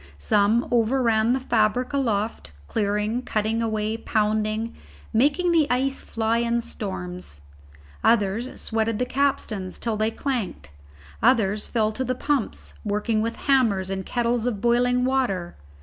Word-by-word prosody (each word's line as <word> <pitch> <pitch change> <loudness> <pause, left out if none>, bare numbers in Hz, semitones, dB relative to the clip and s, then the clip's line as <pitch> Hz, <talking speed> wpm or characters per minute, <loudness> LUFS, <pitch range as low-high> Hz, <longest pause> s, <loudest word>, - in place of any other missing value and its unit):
Some 205 - +2
overran 230 -1 +3
the 265 - +1
fabric 240 +1 +1
aloft, 225 - -1 0.2
clearing, 210 +2 0
cutting 220 -1 -1
away, 220 -1 -1
pounding, 215 +1 0 0.4
making 295 +10 +3
the 320 -4 +3
ice 265 +2 0
fly 225 0 0
in 235 0 +1
storms; 180 - -6 0.6
others 225 +2 +1
sweated 225 -1 -1
the 250 - 0
capstans 245 -8 -1
till 225 -2 -2
they 215 +1 +1
clanked; 220 - -3 0.5
others 215 -4 +3
fell 220 -2 +1
to 260 +4 -3
the 255 0 -1
pumps, 280 -2 -1
working 215 +1 0
with 230 +1 -2
hammers 215 -9 +2
and 190 0 -2
kettles 240 +2 0
of 220 -5 -1
boiling 245 +2 +2
water. 245 -10 0
225 Hz, 135 wpm, -24 LUFS, 210-250 Hz, 0.6 s, overran